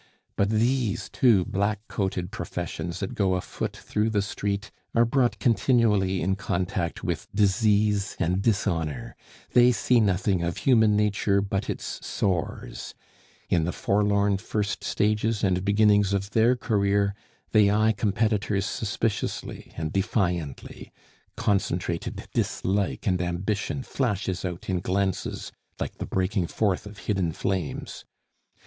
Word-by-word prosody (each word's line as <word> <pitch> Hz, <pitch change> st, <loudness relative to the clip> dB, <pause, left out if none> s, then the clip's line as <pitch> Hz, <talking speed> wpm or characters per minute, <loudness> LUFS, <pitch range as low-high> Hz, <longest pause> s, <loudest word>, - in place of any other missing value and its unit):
But 100 Hz, -, +2 dB
these 115 Hz, 0 st, +1 dB
two 110 Hz, -8 st, +4 dB
black 100 Hz, +1 st, -1 dB
coated 95 Hz, -2 st, -2 dB
professions 85 Hz, 0 st, -5 dB
that 95 Hz, -, -3 dB
go 95 Hz, -3 st, +1 dB
afoot 90 Hz, -, -4 dB
through 105 Hz, +1 st, -1 dB
the 105 Hz, -2 st, +1 dB
street 100 Hz, 0 st, -3 dB, 0.2 s
are 115 Hz, 0 st, +5 dB
brought 120 Hz, 0 st, +2 dB
continually 105 Hz, -5 st, +2 dB
in 95 Hz, +2 st, +1 dB
contact 90 Hz, -4 st, -2 dB
with -, -, -2 dB
disease 105 Hz, 0 st, +2 dB
and 90 Hz, +2 st, +1 dB
dishonor; 85 Hz, -, -1 dB, 0.4 s
they 125 Hz, 0 st, +7 dB
see 120 Hz, +2 st, +3 dB
nothing 95 Hz, -3 st, +2 dB
of 85 Hz, 0 st, -2 dB
human 110 Hz, -5 st, +4 dB
nature 105 Hz, -1 st, +2 dB
but 100 Hz, 0 st, -2 dB
its -, -, -5 dB
sores; 90 Hz, -5 st, -3 dB, 0.5 s
in 85 Hz, -3 st, +2 dB
the 90 Hz, -, -1 dB
forlorn 100 Hz, 0 st, +2 dB
first 105 Hz, 0 st, -2 dB
stages 105 Hz, +1 st, 0 dB
and 95 Hz, -2 st, +2 dB
beginnings 105 Hz, -1 st, +4 dB
of 100 Hz, +1 st, -1 dB
their 115 Hz, +3 st, +4 dB
career 100 Hz, -4 st, +1 dB, 0.4 s
they 105 Hz, -2 st, +5 dB
eye 110 Hz, +2 st, +3 dB
competitors 105 Hz, -1 st, 0 dB
suspiciously 105 Hz, -1 st, -3 dB
and 80 Hz, -1 st, -3 dB
defiantly; 90 Hz, -, -2 dB, 0.5 s
concentrated 90 Hz, -4 st, -1 dB
dislike 100 Hz, +1 st, -1 dB
and 90 Hz, -3 st, +1 dB
ambition 100 Hz, +9 st, -2 dB
flashes 100 Hz, -9 st, -2 dB
out 90 Hz, -2 st, -5 dB
in 95 Hz, -2 st, 0 dB
glances 95 Hz, +1 st, -2 dB, 0.3 s
like -, -, -4 dB
the -, -, -4 dB
breaking 95 Hz, -1 st, 0 dB
forth 100 Hz, 0 st, 0 dB
of 105 Hz, 0 st, -11 dB
hidden 95 Hz, -5 st, 0 dB
flames. 90 Hz, -1 st, -3 dB
100 Hz, 130 wpm, -26 LUFS, 95-105 Hz, 0.5 s, they